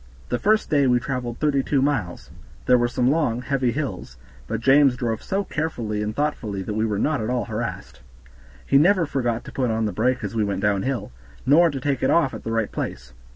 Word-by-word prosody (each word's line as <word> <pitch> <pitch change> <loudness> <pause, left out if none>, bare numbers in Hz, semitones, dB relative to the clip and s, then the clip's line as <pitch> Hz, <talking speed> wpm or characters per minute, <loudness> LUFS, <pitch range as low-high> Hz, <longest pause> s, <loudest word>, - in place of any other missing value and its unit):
The 125 - -1
first 215 - +2
day 140 -3 +4
we 125 -1 +3
traveled 125 -2 -4
thirty 145 -3 +1
two 140 +1 0
miles. 130 -11 -2 0.3
There 125 -1 +5
were 120 - +2
some 125 +2 +1
long, 125 -6 0
heavy 130 -3 0
hills, 130 - -5 0.3
but 115 0 -2
James 135 +2 +5
drove 115 -3 -2
so 195 +1 -1
carefully 120 - -3
and 105 +1 -3
thoughtfully 110 -10 -2
that 105 - -4
we 110 +1 0
were 105 -2 -1
not 145 +4 0
at 110 - -3
all 125 -1 -1
harassed. 115 +1 -5 0.6
He 140 - +4
never 180 +2 +4
forgot 120 -5 -2
to - - -9
put 130 -3 -1
on 110 0 0
the 105 - -1
brake 125 +5 0
as 105 - -4
we 110 -2 +1
went 100 -2 -2
downhill, 105 +6 -1 0.3
nor 165 +6 +5
to 140 -3 -4
take 135 0 -1
it 130 - +2
off 160 -6 +3
at - - -8
the 115 - -4
right 115 -2 -1
place. 65 0 -5
125 Hz, 220 wpm, -23 LUFS, 110-140 Hz, 0.6 s, There